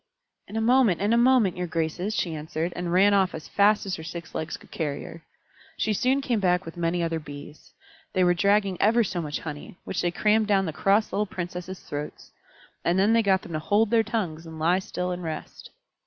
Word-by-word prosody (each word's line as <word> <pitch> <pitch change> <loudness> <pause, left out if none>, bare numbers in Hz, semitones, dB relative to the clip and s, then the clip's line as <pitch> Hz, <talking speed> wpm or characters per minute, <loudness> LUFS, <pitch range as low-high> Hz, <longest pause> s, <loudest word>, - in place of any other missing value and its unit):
"In - - -9
a 225 - 0
moment, 235 -5 +4
in 205 +3 +1
a - - +5
moment, 240 -5 +4
your 180 0 -2
graces," 165 +5 -2
she 170 - -1
answered, 160 +2 -3
and 175 -1 -3
ran 195 +3 +5
off 190 -2 +2
as 155 - -8
fast 205 +1 +3
as 190 -1 -3
her 160 - -8
six 165 0 -8
legs 155 0 -4
could - - -19
carry 145 -3 -3
her. 165 - -10 0.6
She 215 - 0
soon 260 +6 +1
came 245 -5 0
back 180 -1 +1
with 165 - -8
many 170 0 0
other 165 -1 -1
Bees. 145 0 -11 0.4
They 185 - +3
were 175 0 +4
dragging 200 0 +2
ever 230 +3 +4
so 185 -4 -3
much 150 -2 -4
honey, 150 +2 -8
which 180 - -3
they 175 - +1
crammed 210 +4 +2
down 195 -2 +3
the 160 - -3
cross 200 +6 +2
little 210 +1 0
Princesses' 180 0 -6
throats. 145 +1 -7 0.5
And 175 +2 +2
then 200 +4 +4
they 230 - +5
got 190 -3 +2
them 170 - -9
to 155 - -1
hold 205 +7 +2
their 230 -1 +5
tongues 185 -8 -3
and 160 0 -9
lie 170 +4 +2
still 180 -1 -4
and 180 0 -4
rest. 160 -2 -7
180 Hz, 225 wpm, -26 LUFS, 165-210 Hz, 0.6 s, a